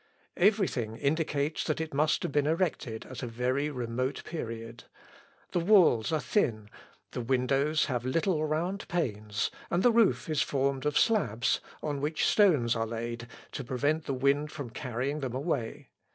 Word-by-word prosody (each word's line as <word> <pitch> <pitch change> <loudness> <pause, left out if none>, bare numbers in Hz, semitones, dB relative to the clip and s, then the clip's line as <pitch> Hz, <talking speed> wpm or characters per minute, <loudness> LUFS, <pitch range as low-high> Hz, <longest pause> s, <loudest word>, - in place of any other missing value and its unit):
Everything 180 - +2
indicates 150 0 0
that 155 - -1
it 160 -2 -4
must 155 +3 +2
have - - -2
been 145 +1 +2
erected 155 -9 -1
at 130 -2 -8
a 125 - -3
very 125 +5 -1
remote 125 0 -3
period. 115 -7 -6 0.7
The - - +1
walls 170 - +5
are 155 - +2
thin. 110 - 0 0.4
The - - -3
windows 135 +5 +1
have 125 -4 -2
little 155 +5 +1
round 170 +6 -2
panes, 105 - -1 0.2
and 175 +2 +1
the 245 - +6
roof 225 -5 +3
is 155 -3 +1
formed 140 0 0
of 150 - +1
slabs, 130 - +2 0.2
on 145 -2 -2
which 150 +2 0
stones 150 - +4
are 115 0 -1
laid 115 +1 -5 0.2
to 135 - -5
prevent 145 +6 0
the 135 - -2
wind 140 +3 +1
from 135 -6 -6
carrying 130 +3 -3
them 130 -3 -4
away. 135 -5 -3
140 Hz, 160 wpm, -29 LUFS, 120-155 Hz, 0.7 s, the